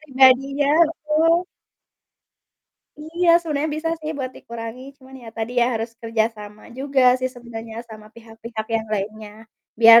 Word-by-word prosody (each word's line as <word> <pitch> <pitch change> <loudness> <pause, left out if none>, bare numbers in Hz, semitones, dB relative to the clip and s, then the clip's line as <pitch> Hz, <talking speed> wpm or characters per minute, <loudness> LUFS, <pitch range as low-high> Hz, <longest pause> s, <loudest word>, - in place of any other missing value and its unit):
pribadinya, 275 0 +4 0.2
betul. 330 +3 +1 1.5
Iya, 335 +3 -2
sebenarnya 305 -2 -2
bisa 325 +1 -2
sih 310 0 -4
buat 255 -1 -3
dikurangi, 230 +2 -8 0.2
cuman 265 0 -15
ya 230 - -10
tadi 225 +2 -3
ya 235 - +4
harus 225 +1 -3
kerja 225 -1 +1
sama 210 0 -11 0.2
juga 275 0 0 0.2
sih 255 - 0
sebenarnya 230 -2 -9
sama 215 -1 -11
pihak-pihak 225 -1 -8
yang 220 - -4
lainnya. 210 +1 -5 0.5
Biar, 230 0 +10
240 Hz, 140 wpm, -22 LUFS, 225-290 Hz, 1.5 s, Biar